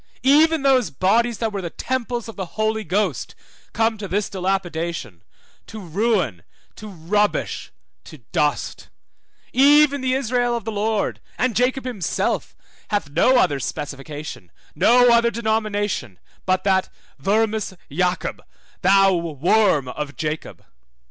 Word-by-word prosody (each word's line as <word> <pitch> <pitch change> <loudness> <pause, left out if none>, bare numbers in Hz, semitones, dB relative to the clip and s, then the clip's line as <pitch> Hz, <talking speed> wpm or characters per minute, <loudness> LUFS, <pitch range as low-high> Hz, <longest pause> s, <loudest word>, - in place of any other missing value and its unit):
Even 305 +3 +4
those 260 -7 +3
bodies 225 - +1
that 225 -2 -2
were 200 - -3
the 170 - -4
temples 245 +2 -3
of 225 - -9
the 190 -2 -5
Holy 220 0 0
Ghost 190 - -1 0.4
come 225 -1 0
to 200 - -5
this 200 +2 -1
dilapidation, 170 - -3 0.5
to 220 - -8
ruin, 185 - 0 0.3
to 215 - -10
rubbish, 205 +3 -1 0.3
to - - -11
dust; - - -1 0.6
even 285 +1 +5
the 260 0 +1
Israel 245 -2 0
of 225 - -8
the 225 - -3
Lord, 215 0 -1 0.2
and 255 -4 0
Jacob 255 +2 +1
himself, 230 -8 -2 0.3
hath 205 -9 -1
no 250 - +4
other 145 - +2
specification, 145 - -6 0.2
no 245 +1 +5
other 235 0 +4
denomination, 215 - -2 0.3
but 185 0 +1
that 190 -1 +2 0.3
vermis 215 +4 0 0.2
Jacob, 180 +4 -1 0.4
thou 195 +1 +5
worm 170 -1 +2
of 145 +3 -5
Jacob. 155 0 -5
205 Hz, 130 wpm, -22 LUFS, 170-235 Hz, 0.6 s, even